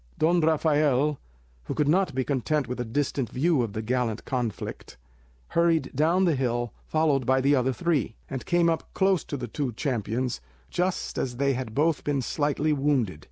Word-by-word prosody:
Don 170 +2 +3
Rafael, 150 -3 +2 0.5
who - - -4
could 150 -2 +1
not 185 0 +2
be 130 - +1
content 140 +1 0
with 125 +1 -4
a - - 0
distant 130 +1 -1
view 150 +1 +2
of 115 -4 -3
the 110 +1 -3
gallant 120 -2 -1
conflict, 115 - -4 0.5
hurried 165 -4 +2
down 165 +7 +3
the 170 - +3
hill, 120 -3 -1
followed 155 -4 +2
by 130 0 +4
the 140 +2 +3
other 130 0 +2
three, 145 - -1
and 135 -2 -5
came 175 -1 +3
up 165 -1 -2
close 190 -2 +2
to 145 - -4
the 125 -2 -5
two 130 +1 -3
champions 120 - -2 0.3
just 180 +1 -1
as 125 -2 -3
they 140 +1 +2
had 125 -4 -5
both 155 +1 +2
been 140 -3 0
slightly 150 +3 0
wounded. 135 - 0
140 Hz, 180 wpm, -26 LUFS, 125-155 Hz, 0.5 s, by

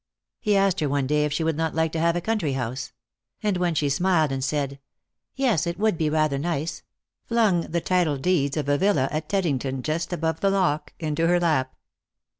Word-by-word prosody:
He 210 -3 +2
asked 195 -1 +2
her 150 - 0
one 140 -1 0
day 150 +2 +2
if 150 - -2
she 150 +3 -1
would 160 -1 0
not 160 -1 -1
like 160 -1 +1
to 165 - -2
have 170 +1 +2
a 175 - -1
country 210 -9 -1
house; 130 0 -4 0.5
and 210 -2 +1
when 175 -2 0
she 150 - +1
smiled 160 0 +2
and 135 -1 -2
said 140 -1 -2 0.3
" - - -58
Yes, 230 - +1
it 170 0 -3
would 215 -1 +2
be 155 -2 0
rather 155 -2 +1
nice," 165 0 -2 0.4
flung 215 -8 +1
the 170 +1 -1
title 175 -6 +1
deeds 140 -1 +1
of 145 -2 -2
a 145 0 +2
villa 190 -10 +2
at 155 +1 -3
Teddington, 135 -9 -1
just 165 +3 -2
above 160 -2 -1
the 195 - +2
lock, 185 -6 0
into 160 0 0
her 175 +1 +3
lap. 150 -7 0
160 Hz, 215 wpm, -24 LUFS, 145-180 Hz, 0.5 s, her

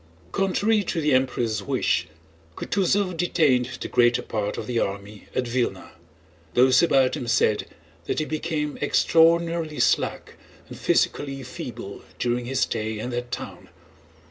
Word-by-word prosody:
Contrary 205 +3 +1
to 175 - -2
the 150 -2 +2
Emperor's 120 -4 +1
wish 100 - 0 0.5
Kutúzov 195 -1 0
detained 150 -7 +1
the - - -3
greater 120 0 +3
part 105 -2 -3
of - - -4
the 120 -2 -1
army 100 +1 -4
at 130 - +1
Vílna. 120 0 -2 0.6
Those 130 +1 +5
about 135 -6 +3
him 125 - -5
said 110 -2 +2 0.4
that - - -2
he 155 - 0
became 155 -1 -3
extraordinarily 165 +1 +3
slack - - 0 0.3
and - - -10
physically 135 -2 0
feeble 120 -4 -8 0.2
during 120 0 -1
his 130 +1 -1
stay 110 0 -1
in 120 +4 -4
that 120 0 -4
town. - - -7
130 Hz, 140 wpm, -24 LUFS, 120-160 Hz, 0.6 s, Those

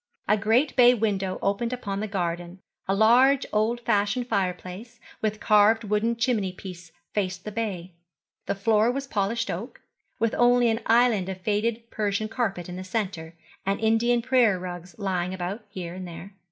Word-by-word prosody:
A 210 - +4
great 225 +7 +2
bay 245 -1 +7
window 195 -4 -1
opened 200 +4 0
upon 200 -6 -4
the 215 - -2
garden, 175 -2 -3 0.3
a 195 - +1
large 250 +6 +5
old 220 +3 +1
fashioned 230 +2 0
fireplace, 195 +2 -3 0.2
with 215 -1 -1
carved 215 +2 +4
wooden 210 +3 0
chimney 230 -5 0
piece 180 -2 -10 0.2
faced 185 -3 -2
the 210 - -4
bay. 190 -5 -4 0.5
The - - 0
floor 215 +3 +3
was 275 +2 -3
polished 225 -1 -1
oak, 205 +9 -6 0.4
with 230 -1 0
only 245 0 +5
an 225 0 0
island 225 -5 +3
of 190 -1 -5
faded 220 +3 -1
Persian 210 0 -1
carpet 215 -7 -2
in 180 0 -7
the 185 - -6
centre, 185 -5 -4 0.3
and 195 +1 -1
Indian 230 +2 +2
prayer 245 -6 +3
rugs 180 -1 -8
lying 185 -2 -2
about 190 +5 -5
here 180 -4 -6
and 185 0 -7
there. 170 +4 -10
210 Hz, 165 wpm, -26 LUFS, 185-230 Hz, 0.5 s, bay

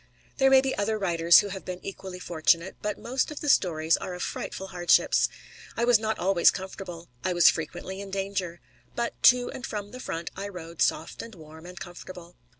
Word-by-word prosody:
There 270 0 +5
may 265 0 +7
be 265 0 -1
other 215 +2 0
writers 170 -4 +5
who 205 - -5
have 190 -1 -7
been 180 -1 -6
equally 190 -1 -7
fortunate, 170 +1 +1
but 210 0 -2
most 255 +2 -1
of 300 - -7
the 295 - -5
stories 160 - +3
are 180 - -6
of 180 - -5
frightful 190 0 -5
hardships. 175 -2 +3 0.5
I 235 - +2
was 240 -2 +5
not 220 0 -2
always 180 -1 +4
comfortable. 185 -3 -7
I 185 - 0
was 175 -1 +7
frequently 185 +4 -6
in 200 - -8
danger. 195 -3 -3 0.3
But 235 0 -1
to 245 0 +5
and 255 - -8
from 205 -2 -5
the 255 - -9
front 165 -8 -5
I 195 +1 -5
rode 170 -4 -8
soft 160 - 0
and 230 -2 -10
warm 160 0 -13
and 180 0 -10
comfortable. 175 -1 -10
190 Hz, 200 wpm, -27 LUFS, 170-210 Hz, 0.5 s, may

